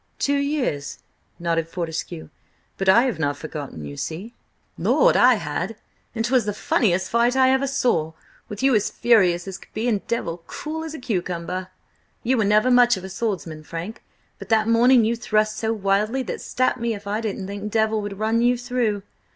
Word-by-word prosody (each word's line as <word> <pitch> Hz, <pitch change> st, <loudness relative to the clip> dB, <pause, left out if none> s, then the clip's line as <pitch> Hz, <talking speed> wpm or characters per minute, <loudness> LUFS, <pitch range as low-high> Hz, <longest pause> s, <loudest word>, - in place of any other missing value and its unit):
"Two 285 Hz, 0 st, +1 dB
years," 275 Hz, -, -2 dB, 0.4 s
nodded 165 Hz, -1 st, -1 dB
Fortescue, 165 Hz, -2 st, -5 dB, 0.5 s
"but 195 Hz, 0 st, 0 dB
I 230 Hz, +5 st, +7 dB
have 255 Hz, -9 st, -1 dB
not 145 Hz, -2 st, 0 dB
forgotten, 145 Hz, -, -7 dB
you 70 Hz, 0 st, -7 dB
see!" 185 Hz, -, -5 dB, 0.4 s
"Lord, -, -, +3 dB
I 250 Hz, 0 st, +6 dB
had! 180 Hz, +3 st, -3 dB, 0.4 s
And 225 Hz, 0 st, -1 dB
'twas 245 Hz, -2 st, +2 dB
the 210 Hz, -1 st, -2 dB
funniest 190 Hz, -4 st, +1 dB
fight 235 Hz, +2 st, +3 dB
I 260 Hz, 0 st, +5 dB
ever 265 Hz, +1 st, +2 dB
saw, 240 Hz, -, 0 dB, 0.4 s
with 210 Hz, +3 st, -6 dB
you 270 Hz, -1 st, +4 dB
as 210 Hz, -2 st, +2 dB
furious 185 Hz, -7 st, +3 dB
as 190 Hz, 0 st, -6 dB
could -, -, -18 dB
be 220 Hz, +3 st, -1 dB
and 210 Hz, -5 st, +1 dB
Devil 175 Hz, -7 st, -2 dB
cool 315 Hz, +1 st, -5 dB
as 320 Hz, -1 st, -6 dB
a -, -, -7 dB
cucumber. 180 Hz, -4 st, -3 dB, 0.6 s
You 255 Hz, +2 st, +2 dB
were 220 Hz, -, +2 dB
never 215 Hz, +5 st, +3 dB
much 245 Hz, -3 st, +5 dB
of 185 Hz, -, -8 dB
a 190 Hz, -, -6 dB
swordsman, 175 Hz, -7 st, -3 dB
Frank, 170 Hz, +8 st, -7 dB, 0.4 s
but -, -, -10 dB
that 220 Hz, -1 st, +3 dB
morning 235 Hz, +1 st, +5 dB
you 230 Hz, +2 st, +1 dB
thrust 215 Hz, -1 st, 0 dB
so 220 Hz, 0 st, -1 dB
wildly 210 Hz, +4 st, 0 dB
that -, -, -5 dB
stap 255 Hz, 0 st, 0 dB
me 235 Hz, -2 st, -1 dB
if 200 Hz, -, -11 dB
I 210 Hz, +2 st, -2 dB
didn't 205 Hz, -3 st, -3 dB
think 200 Hz, +2 st, -5 dB
Devil 220 Hz, 0 st, +1 dB
would 205 Hz, -1 st, -6 dB
run 220 Hz, +2 st, +1 dB
you 245 Hz, +1 st, +3 dB
through. 240 Hz, -5 st, -1 dB
215 Hz, 190 wpm, -23 LUFS, 180-240 Hz, 0.6 s, I